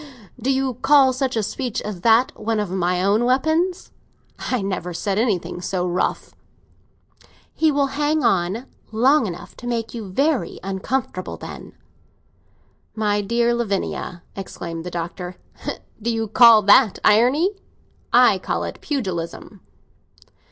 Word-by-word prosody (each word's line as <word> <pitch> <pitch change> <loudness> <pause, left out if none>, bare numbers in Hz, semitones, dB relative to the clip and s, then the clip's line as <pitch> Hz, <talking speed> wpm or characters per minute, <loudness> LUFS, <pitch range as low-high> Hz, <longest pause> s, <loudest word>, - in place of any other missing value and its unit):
"Do 260 +4 +1
you 265 -1 0
call 275 -3 +5
such 260 0 -1
a 220 - 0
speech 245 +2 -3
as 205 -4 -6
that 230 +5 +4
one 225 0 -2
of 205 -4 -3
my 180 -1 0
own 205 +4 +2
weapons? 315 +9 0 0.5
I 250 -6 -2
never 180 -3 -3
said 195 +3 -1
anything 200 -6 -1
so 180 0 -2
rough." 180 0 -2 1.2
"He 315 -1 +2
will 285 -1 +2
hang 295 +1 0
on 195 +3 +1 0.3
long 250 +3 +3
enough 175 -2 -8
to 245 - -8
make 230 -2 -2
you 220 -5 -6
very 270 - 0
uncomfortable, 195 +1 -3
then." - - -9 1.2
"My 210 -1 +1
dear 235 +3 +1
Lavinia," 200 -5 -3
exclaimed 170 -4 -6
the - - -4
Doctor, 175 +1 -5 0.7
"do 235 - -1
you 225 -1 -1
call 225 0 +7
that 205 +2 +5
irony? 255 - +4 0.6
I - - +5
call - - -2
it - - -6
pugilism." 185 - -4
220 Hz, 135 wpm, -21 LUFS, 185-260 Hz, 1.2 s, call